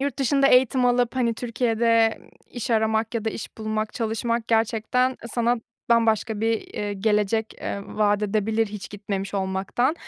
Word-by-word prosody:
Yurt 280 Hz, -1 st, -2 dB
dışında 275 Hz, +1 st, +3 dB
eğitim 255 Hz, -1 st, +4 dB
alıp 245 Hz, 0 st, +2 dB
hani 235 Hz, -3 st, +1 dB
Türkiye'de 230 Hz, -1 st, +1 dB, 0.3 s
iş 245 Hz, -1 st, -5 dB
aramak 220 Hz, 0 st, +1 dB
ya 225 Hz, -1 st, -2 dB
da 220 Hz, -, 0 dB
iş 220 Hz, -, -8 dB
bulmak, 215 Hz, 0 st, -2 dB
çalışmak 230 Hz, 0 st, -2 dB
gerçekten 230 Hz, +3 st, +1 dB, 0.2 s
sana 240 Hz, 0 st, +2 dB, 0.3 s
bambaşka 225 Hz, -2 st, +2 dB
bir, 225 Hz, 0 st, -2 dB
ııı, 205 Hz, -, -2 dB
gelecek, 210 Hz, +2 st, 0 dB
eee, 200 Hz, -, -3 dB
vaat 210 Hz, -1 st, +1 dB
edebilir 215 Hz, +2 st, +1 dB
hiç 205 Hz, -3 st, -8 dB
gitmemiş 200 Hz, -1 st, -4 dB
olmaktan 195 Hz, +8 st, 0 dB
225 Hz, 150 wpm, -24 LUFS, 210-240 Hz, 0.3 s, eğitim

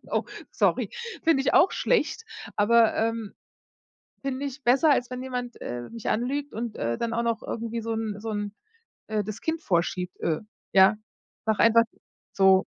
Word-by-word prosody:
Oh, -, -, +1 dB, 0.3 s
sorry. -, -, +1 dB, 0.3 s
Finde 320 Hz, -4 st, +4 dB
ich 280 Hz, -, +1 dB
auch 385 Hz, -, +6 dB
schlecht, 450 Hz, -1 st, +1 dB, 0.3 s
aber, 225 Hz, +2 st, +4 dB
ähm, 225 Hz, -2 st, -1 dB, 0.9 s
finde 275 Hz, +1 st, -2 dB
ich 275 Hz, +1 st, -6 dB
besser, 270 Hz, +5 st, +5 dB
als 245 Hz, -2 st, +2 dB
wenn 250 Hz, 0 st, -4 dB
jemand, 250 Hz, -2 st, -5 dB
äh, 120 Hz, 0 st, -5 dB
mich 230 Hz, -1 st, -5 dB
anlügt 275 Hz, +6 st, -1 dB
und, 230 Hz, 0 st, -4 dB
äh, 115 Hz, 0 st, -1 dB
dann 230 Hz, 0 st, -2 dB
auch 235 Hz, +1 st, 0 dB
noch 230 Hz, -1 st, 0 dB
irgendwie 230 Hz, 0 st, -4 dB
so 225 Hz, +1 st, -2 dB
'n 220 Hz, -2 st, -3 dB
so 220 Hz, +1 st, -4 dB
'n 205 Hz, 0 st, -3 dB, 0.5 s
äh, 215 Hz, -1 st, 0 dB
das 215 Hz, +2 st, -6 dB
Kind 320 Hz, 0 st, -2 dB
vorschiebt, 180 Hz, -, -1 dB
äh. 160 Hz, +2 st, 0 dB, 0.3 s
Ja, 195 Hz, +2 st, +6 dB, 0.5 s
sage 220 Hz, -1 st, +1 dB
einfach 230 Hz, +1 st, +6 dB, 0.5 s
so. 190 Hz, 0 st, +5 dB
230 Hz, 170 wpm, -26 LUFS, 205-255 Hz, 0.9 s, auch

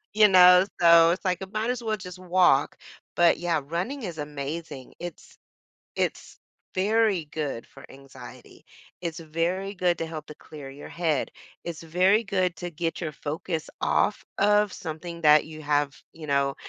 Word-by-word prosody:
You 215 Hz, 0 st, +7 dB
know? 180 Hz, -1 st, +7 dB
So, 170 Hz, -1 st, +7 dB
it's 185 Hz, +3 st, -3 dB
like, 180 Hz, -2 st, 0 dB
I -, -, -3 dB
might 215 Hz, +4 st, -2 dB
as 250 Hz, -1 st, -5 dB
well 220 Hz, -1 st, -1 dB
just 180 Hz, -2 st, -10 dB
walk. 180 Hz, -6 st, +3 dB, 0.4 s
But, 175 Hz, -1 st, +4 dB
yeah, 170 Hz, -3 st, 0 dB
running 185 Hz, -, -3 dB
is 175 Hz, -5 st, -5 dB
amazing. 145 Hz, -1 st, -6 dB
It's 175 Hz, -2 st, -9 dB, 0.6 s
it's -, -, -3 dB, 0.4 s
very 205 Hz, -2 st, +2 dB
good 150 Hz, -5 st, -5 dB
for -, -, -14 dB
anxiety. 135 Hz, 0 st, -14 dB, 0.4 s
It's 170 Hz, -2 st, -4 dB
very 170 Hz, +5 st, -2 dB
good 180 Hz, -2 st, +1 dB
to 165 Hz, -, -2 dB
help 155 Hz, -2 st, -7 dB
to 150 Hz, -, -10 dB
clear 145 Hz, -3 st, -11 dB
your 140 Hz, +2 st, -10 dB
head. 165 Hz, -4 st, -1 dB, 0.3 s
It's 170 Hz, -1 st, -6 dB
very 185 Hz, +7 st, +3 dB
good 185 Hz, -4 st, 0 dB
to 175 Hz, -, -5 dB
get 165 Hz, +1 st, -3 dB
your 160 Hz, -3 st, -3 dB
focus 155 Hz, +2 st, -5 dB
off 210 Hz, -, +1 dB
of 210 Hz, 0 st, +3 dB
something 170 Hz, +1 st, -7 dB
that 150 Hz, -1 st, +6 dB
you 155 Hz, 0 st, -10 dB
have, 145 Hz, -1 st, 0 dB
you 160 Hz, -2 st, -10 dB
know, 140 Hz, -1 st, +1 dB
170 Hz, 165 wpm, -26 LUFS, 155-185 Hz, 0.6 s, You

